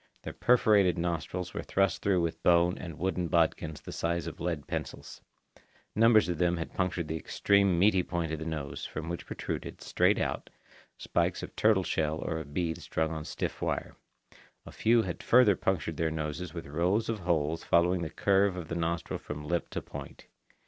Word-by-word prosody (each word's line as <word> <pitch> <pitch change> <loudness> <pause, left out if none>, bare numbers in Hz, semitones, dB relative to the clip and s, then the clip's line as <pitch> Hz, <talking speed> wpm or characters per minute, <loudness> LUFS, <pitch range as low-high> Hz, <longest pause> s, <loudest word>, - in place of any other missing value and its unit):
Their - - -6
perforated 105 -7 +4
nostrils 85 +1 -3
were - - -3
thrust 95 0 +1
through 95 -3 +2
with 85 -1 -2
bone 85 0 +4
and 85 -4 -8
wooden 90 0 -1
bodkins 80 -3 +1
the - - -8
size 85 0 -1
of - - -7
lead 85 -4 -2
pencils. - - -6 0.7
Numbers 110 -2 +5
of 85 -3 -2
them 90 -1 +2
had 80 - -5
punctured 90 -3 -1
the 80 - -2
extreme 100 +2 +2
meaty 95 +1 +4
point 85 -2 -3
of 80 - -3
the 80 - -5
nose, 75 -4 -4
from 80 +1 -5
which 85 - -5
protruded, - - -5
straight - - +2
out, - - -2 0.5
spikes - - -1
of - - -8
turtle 105 -3 +3
shell 80 -2 0
or 80 0 -3
of 75 -3 -9
beads 80 +1 -2
strung 80 0 -1
on 80 -1 -5
stiff - - -4
wire. - - -2 0.7
A - - -10
few 115 0 +3
had 90 -4 -5
further 115 -5 +5
punctured 85 -5 -1
their 80 +1 +1
noses 80 +2 -4
with 85 -1 -7
rows 90 +9 0
of 115 -2 -2
holes 80 -3 0
following 85 +1 +3
the 80 - -3
curves 100 +1 +2
of 85 -3 -6
the 85 - -3
nostrils 85 -1 -2
from 75 0 -6
lip 85 +2 -1
to - - -4
point. 70 -1 -9
85 Hz, 190 wpm, -30 LUFS, 80-95 Hz, 0.7 s, Numbers